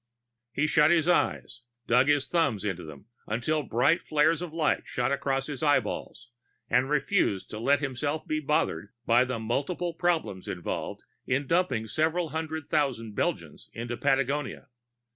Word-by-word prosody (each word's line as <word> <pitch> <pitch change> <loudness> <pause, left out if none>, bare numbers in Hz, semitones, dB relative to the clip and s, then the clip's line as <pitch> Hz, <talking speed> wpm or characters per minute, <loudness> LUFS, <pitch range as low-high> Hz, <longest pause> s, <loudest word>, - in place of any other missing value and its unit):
He 145 - 0
shut 150 0 +4
his 170 -1 +3
eyes, 175 -8 +1 0.2
dug 125 +3 +4
his 145 -1 +3
thumbs 140 - +1
into 95 -3 -2
them 75 +3 -11 0.2
until 125 +8 0
bright 130 +6 +2
flares 155 +2 +2
of 175 -3 -5
light 160 -1 +1
shot 125 +1 -1
across 135 -1 0
his 145 -3 -5
eyeballs, 145 -5 0 0.4
and 130 +2 +3
refused 145 - +1
to 105 - -5
let 140 +5 +2
himself 145 +3 -2
be 155 - -1
bothered 135 - 0 0.2
by 120 +2 +4
the 130 -2 -3
multiple 140 +10 -2
problems 165 - -1
involved 90 -2 -4 0.2
in 135 +3 +1
dumping 135 -8 +1
several 160 +6 0
hundred 160 -1 -4
thousand 130 -8 0
Belgians - - -3
into 120 +1 -4
Patagonia. 135 +2 -1
140 Hz, 150 wpm, -28 LUFS, 120-155 Hz, 0.4 s, shut